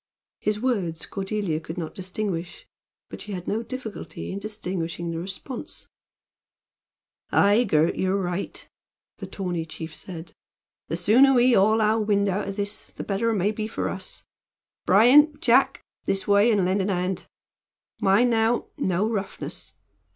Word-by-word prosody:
His 210 0 -1
words 200 -10 -1
Cordelia 195 -4 -2
could 160 +2 -8
not 165 -3 -4
distinguish, 185 -2 -4 0.4
but - - -9
she 210 - -7
had 180 -2 -6
no 220 +2 0
difficulty 235 -3 -7
in 195 - -4
distinguishing 180 -5 -4
the 165 - -3
response. 215 - -6 1.4
"Aye, 205 +5 +4
Gurt, 160 -4 +2
you're 190 +1 +1
right," 180 0 -4 0.5
the - - -7
tawny 180 -4 -3
chief 160 0 -8
said. 170 -1 -8 0.5
"The 165 - -2
sooner 245 +10 +5
we 245 +1 +5
haul 215 +2 +4
our 215 +1 +3
wind 205 -2 +2
out 195 +2 -1
o' - - -2
this 205 +1 -4
the - - -8
better 205 +3 0
it 225 - +1
may 200 +1 +1
be 215 0 -4
for - - -3
us. - - -7 0.6
Bryan! 285 +9 +6
Jack! 250 +1 +3 0.2
This 195 0 0
way, 205 +3 +5
and 200 -4 +2
lend 190 +2 +1
a 195 +2 0
hand. 180 0 -2 0.7
Mind 210 +6 +4
now, 225 +1 +1
no 190 +3 +1
roughness! 200 -4 -5
200 Hz, 150 wpm, -25 LUFS, 180-220 Hz, 1.4 s, Bryan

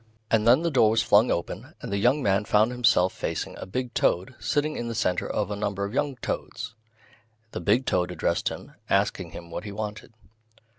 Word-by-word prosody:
And 110 0 +3
then 130 +7 +6
the 170 - +1
door 120 -6 +5
was 110 0 +2
flung 105 +2 +5
open, 85 - -3
and - - -7
the 100 - +1
young 130 +7 +3
man 100 +1 +2
found 110 +3 +3
himself 115 -7 +3
facing - - -4
a - - -7
big 125 +5 -3
toad 90 +9 +1
sitting 155 +1 0
in 120 - -3
the 115 - -4
centre 90 -3 0
of 105 -1 -1
a - - -1
number 100 -1 -2
of 100 - -6
young 140 0 0
toads. 115 -1 -4 0.8
The - - -5
big 110 +9 +2
toad 90 -1 +1
addressed 85 -1 0
him, - - -9 0.2
asking - - +1
him 85 -1 -10
what - - -5
he 105 - -6
wanted. 105 +2 -6
105 Hz, 205 wpm, -26 LUFS, 100-120 Hz, 0.8 s, then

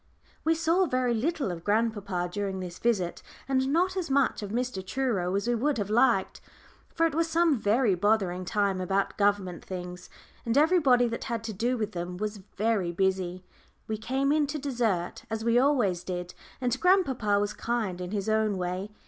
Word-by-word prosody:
We 325 +1 +3
saw 330 +3 +2
very 255 -3 +1
little 270 - -1
of 170 -1 -7
grandpapa 205 -4 0
during 195 -1 -2
this 180 -1 -7
visit, 200 -7 0 0.3
and 265 -1 +1
not 360 +5 +2
as 365 -5 -2
much 270 -3 +2
of 205 - -5
Mr. 240 -3 -2
Truro 195 -5 -1
as 200 +3 -1
we 240 - +2
would 270 +4 0
have 205 -1 -2
liked. 230 -3 +2 0.5
For 330 - +1
it 325 - 0
was 330 +2 +1
some 325 -5 +3
very 215 +1 +2
bothering 185 -1 +1
time 195 0 0
about 195 +2 0
government 200 -4 0
things, 180 -1 -7 0.3
and 230 +3 0
everybody 290 -6 +4
that 230 - -5
had 235 -3 -3
to 225 -1 -4
do 240 +6 0
with 215 -2 -2
them 175 0 -5
was 210 +1 -3 0.2
very 210 -5 +1
busy. 185 0 -1 0.4
We 220 - -2
came 270 +5 0
in 300 -1 +2
to 300 +2 -3
dessert, 235 -11 -1
as 220 0 -3
we 235 +1 +4
always 240 -11 +2
did, 180 -1 -5 0.3
and 250 0 -1
grandpapa 265 - +3
was 205 +1 -1
kind 215 -7 -2
in 180 - -4
his 200 0 -3
own 215 -2 +1
way. 180 +2 -3
220 Hz, 185 wpm, -28 LUFS, 190-260 Hz, 0.5 s, everybody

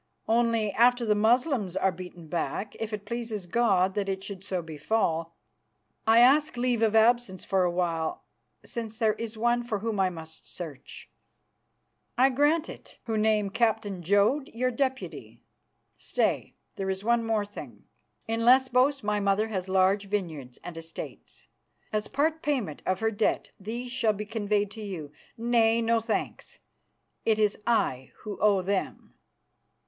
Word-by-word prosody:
"Only, 230 -2 +2
after 245 +3 +4
the 215 - +3
Moslems 220 - +2
are 190 - +2
beaten 180 -1 -10
back, 175 +5 -3
if 225 -1 -3
it 210 -1 -5
pleases 225 -3 -4
God 190 -2 +2
that 200 -1 -1
it 190 0 -3
should 195 -1 -7
so 185 -3 -3
befall, 165 +1 -1 0.7
I 225 +1 +7
ask 285 +2 +4
leave 245 -2 +1
of 220 -1 +3
absence 225 -4 +3
for 190 -1 +2
a - - +2
while, 170 -2 -1 0.4
since 225 -2 -6
there 220 -2 +2
is 225 0 -6
one 240 +2 +2
for 235 -3 -2
whom 215 0 -3
I 190 -1 +3
must 160 -2 -10
search." 155 -6 -9 1.1
"I 265 +2 +5
grant 295 +5 +2
it, - - -11
who 225 -2 -2
name 215 -2 +2
Captain 220 -4 0
Jodd 205 - +2
your 255 +2 +1
deputy. 260 +1 -3 0.5
Stay, - - -1 0.2
there's 190 0 -2
one 235 +1 +2
more 220 -2 0
thing. 205 - -10 0.4
In 225 0 -1
Lesbos 260 +2 +4
my 210 0 0
mother 200 +2 +1
has 190 -3 -3
large 190 +2 +3
vineyards 160 -11 -4
and 175 - -7
estates. 165 0 -9 0.5
As 210 0 -1
part 310 +3 0
payment 250 - -2
of 185 +2 0
her 220 0 +2
debt 215 0 0
these 235 +5 -5
shall 235 -4 +2
be 210 +1 -5
conveyed 205 -2 -1
to 220 0 -9
you. 175 -8 -6 0.3
Nay, 230 -1 +3
no 230 0 +2
thanks; 225 0 -4 0.7
it 220 -1 +2
is 210 -2 +2
I 130 - +1
who 210 -2 -6
owe 200 -3 +3
them. 195 0 -3
215 Hz, 155 wpm, -28 LUFS, 190-235 Hz, 1.1 s, I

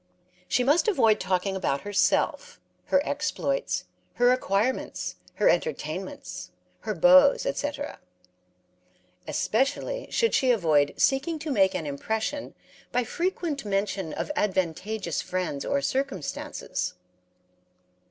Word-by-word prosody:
She 250 - +2
must 295 - +3
avoid 225 - +4
talking 185 +1 0
about 140 -7 -1
herself, 475 - 0 0.3
her 280 +1 +2
exploits, 300 +12 -1 0.3
her 245 0 +5
acquirements, 250 0 -1 0.2
her - - +2
entertainments, 485 -1 -2 0.3
her - - -3
beaux, 275 +1 +7
etc. 290 - -3 1.3
Especially 285 - 0
should 460 -2 +1
she 260 - +3
avoid 155 -11 +3
seeking 285 +5 +2
to 305 0 -4
make 195 -6 +3
an 160 - -2
impression 220 - -3 0.4
by 250 +1 +1
frequent 335 0 -2
mention 195 -4 -1
of - - -3
advantageous 190 - -1
friends 180 -6 -3
or 280 0 0
circumstances. 265 - -3
250 Hz, 105 wpm, -27 LUFS, 190-290 Hz, 1.3 s, beaux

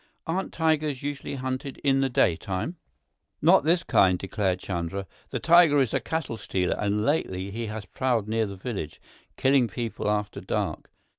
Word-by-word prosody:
"Aren't 185 +4 -2
tigers 155 -4 0
usually 145 0 -4
hunted 130 0 -4
in 135 -1 +3
the 135 - +1
daytime?" 95 - 0 0.6
"Not - - +5
this 170 +2 +3
kind," 95 -2 +4
declared 95 0 -1
Chandra. 95 +1 -4 0.2
"This - - -3
tiger 165 -3 +6
is 130 -5 +1
a - - +2
cattle 160 -8 -3
stealer, 90 -4 -1
and 105 +1 0
lately 100 -11 -1
he 115 +2 -4
has 105 -1 -6
prowled 120 -2 0
near 110 0 0
the 100 - -7
village, 95 -6 -5 0.4
killing 130 -2 +4
people 110 0 -3
after 105 -1 -1
dark. - - -3
115 Hz, 160 wpm, -26 LUFS, 100-140 Hz, 0.6 s, tiger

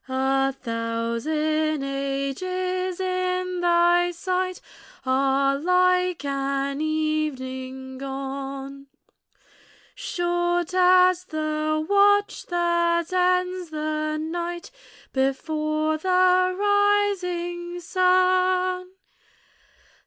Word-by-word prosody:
A 270 +1 +1
thousand 270 +6 -2
ages 350 +7 -3
in 365 -1 -1
thy 345 0 +3
sight 370 +1 -2 0.5
Are 270 +1 +2
like 365 0 +2
an 275 0 -2
evening 265 -4 -3
gone; 275 0 -6 1.1
Short 350 0 -1
as 365 0 +4
the 310 -1 -2
watch 405 +1 +3
that 340 0 +1
ends 365 -1 +1
the 310 0 -2
night 345 +2 -4 0.4
Before 310 +3 -1
the 365 +1 +3
rising 380 -4 0
sun. 365 0 +2
340 Hz, 70 wpm, -24 LUFS, 275-365 Hz, 1.1 s, as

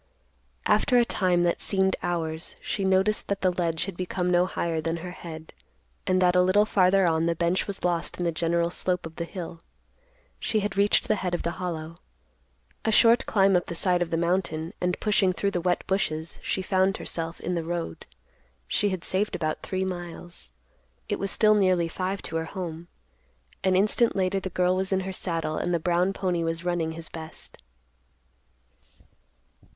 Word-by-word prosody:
After 250 -3 +3
a 240 - +5
time 180 -5 +2
that 170 -1 +1
seemed 190 -1 +2
hours, 165 -1 -3
she 200 - -3
noticed 190 +2 +2
that 200 -1 -2
the 185 - +3
ledge 170 -2 -1
had 195 -2 -6
become 180 0 -1
no 175 +1 +4
higher 165 -3 -2
than 165 +1 -2
her 180 +2 -6
head, 160 -3 -9 0.5
and 185 0 +3
that 180 -1 +4
a 180 - +6
little 190 +3 +4
farther 195 -2 +4
on 165 -1 +2
the 170 - +1
bench 170 +2 0
was 200 -1 -6
lost 175 -1 0
in 180 - -2
the 170 - +1
general 170 +1 0
slope 180 -1 -1
of 160 0 -9
the 170 - -2
hill. 170 -2 -7 0.8
She 215 - 0
had 200 -1 -2
reached 200 +1 +3
the 215 - +2
head 180 -2 -1
of - - -4
the 170 - -1
hollow. 165 -2 -4 0.9
A 220 - +1
short 230 +3 +5
climb 195 -2 +4
up 175 - +1
the 170 - -5
side 180 0 +1
of 175 - 0
the 165 - 0
mountain, 170 -2 -1
and, 180 0 0
pushing 195 -3 +2
through 200 +2 -1
the 175 - -1
wet 180 0 0
bushes, 160 -4 -1
she 190 - -2
found 190 +1 +2
herself 165 0 -4
in 180 - -3
the 170 -2 -1
road. 170 - -4 0.6
She 205 - +1
had 185 -3 -3
saved 200 +3 0
about 155 -2 -2
three 190 0 -2
miles. 175 - -6 0.6
It - - -1
was 195 - -1
still 215 +2 +5
nearly 185 -4 +3
five 185 +3 -3
to 165 - -3
her 160 - -2
home. 170 -2 -6 0.8
An 190 -1 +3
instant 215 +4 +3
later 190 0 +1
the 190 - -5
girl 180 0 +2
was 190 +1 -1
in 190 0 +2
her 190 0 -4
saddle, 165 -4 -2
and 175 - -1
the 170 - +1
brown 175 +3 +2
pony 180 -3 -1
was 165 +1 -3
running 170 -2 0
his 165 0 -6
best. 160 -1 -8
180 Hz, 190 wpm, -26 LUFS, 170-190 Hz, 0.9 s, a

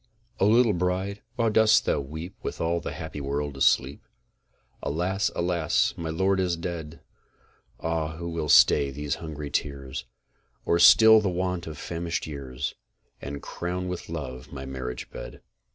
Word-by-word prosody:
O 95 - +4
LITTLE 115 0 +5
BRIDE, 95 +3 -1
WHY 115 -1 +2
DOST 110 +1 +5
THOU - - +1
WEEP 80 +6 -7
WITH - - -5
ALL 85 +1 0
THE - - -5
HAPPY 80 -2 -6
WORLD 70 +1 -2
ASLEEP? 70 +1 +2 0.8
Alas! 90 +7 0
alas! 85 -3 +1
my 80 -1 -4
lord 95 +4 +1
is 90 -2 0
dead! 85 -2 -6 0.8
Ah, 80 -1 -2
who 85 0 -5
will 80 -3 -3
stay 70 0 +6
these 75 +1 -3
hungry 75 -3 -6
tears, 70 -3 -3 0.6
Or 85 - +2
still 110 +4 +8
the 100 - 0
want 90 -1 -2
of 80 -2 -7
famished 85 +1 -3
years, 70 -4 -5 0.5
And 70 +1 -6
crown 90 +1 -4
with 90 -2 -5
love 65 -6 -6
my 65 -1 -7
marriage 65 -2 -6
bed? - - -8
80 Hz, 150 wpm, -26 LUFS, 70-90 Hz, 0.8 s, still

